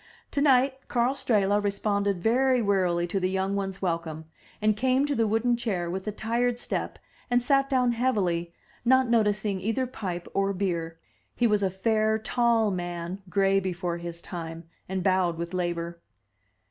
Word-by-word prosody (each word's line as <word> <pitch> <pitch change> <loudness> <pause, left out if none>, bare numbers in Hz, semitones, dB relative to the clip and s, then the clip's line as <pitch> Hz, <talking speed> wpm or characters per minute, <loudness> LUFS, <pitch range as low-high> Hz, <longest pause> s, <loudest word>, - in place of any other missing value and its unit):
Tonight 270 -2 +3
Karl 245 +2 +1
Strehla 205 -6 +1
responded 200 -2 0
very 255 +3 +3
wearily 185 -5 +1
to 180 +3 -1
the 185 +1 -1
yoimg 190 +1 0
ones' 195 -1 -3
welcome, 165 -3 -2 0.3
and 215 0 +2
came 260 +4 +2
to 290 - -1
the 230 -4 +1
wooden 225 +3 +2
chair 195 -8 -2
with 190 +3 -5
a - - 0
tired 235 +3 0
step - - -3 0.3
and 245 0 +2
sat 275 +1 +2
down 250 -3 +3
heavily, 195 -9 0 0.3
not 260 +1 +4
noticing 210 -4 +1
either 225 +6 0
pipe 185 -8 -5
or 195 0 +1
beer. 170 -4 -2 0.4
He 240 - +1
was 210 -2 +3
a 195 - +2
fair, 215 +3 +1
tall 225 -1 +2
man, 175 +1 -4
gray 195 0 +3
before 180 -2 -3
his 170 0 -7
time, 165 -2 -7 0.2
and 190 -1 -2
bowed 185 -3 +2
with 170 +1 -5
labor. 170 -1 -3
200 Hz, 160 wpm, -27 LUFS, 180-235 Hz, 0.4 s, not